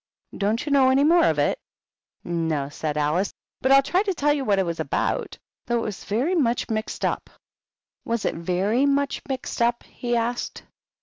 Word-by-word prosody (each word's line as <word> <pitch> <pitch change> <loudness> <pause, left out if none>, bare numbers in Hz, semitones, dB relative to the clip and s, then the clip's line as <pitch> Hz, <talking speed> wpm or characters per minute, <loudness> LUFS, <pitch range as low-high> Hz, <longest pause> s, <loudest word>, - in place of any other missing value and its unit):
"Don't 210 +5 0
you 295 - -3
know 270 -2 +5
any 265 +2 +4
more 335 +2 +5
of - - +2
it?" - - +1 0.5
" - - -58
No," 160 -5 -1
said 150 0 -3
Alice; 155 +6 +1 0.2
" - - -66
but 260 - +2
I'll 275 0 +7
try 360 +7 +2
to 400 -3 -1
tell 295 -1 +2
you 285 -2 -2
what 205 -5 +2
it 190 - +2
was 170 -1 -3
about. - - -1 0.3
Though 240 - +1
it - - 0
was 205 -3 -6
very 250 - 0
much 245 -8 +1
mixed 215 0 -2
up." - - -2 0.7
"Was 230 -2 -2
it - - +1
very 190 +10 +1
much 280 0 0
mixed 260 -2 -4
up?" 235 0 +2
he 240 -1 -3
asked. 235 +1 -2
235 Hz, 200 wpm, -24 LUFS, 190-275 Hz, 0.7 s, I'll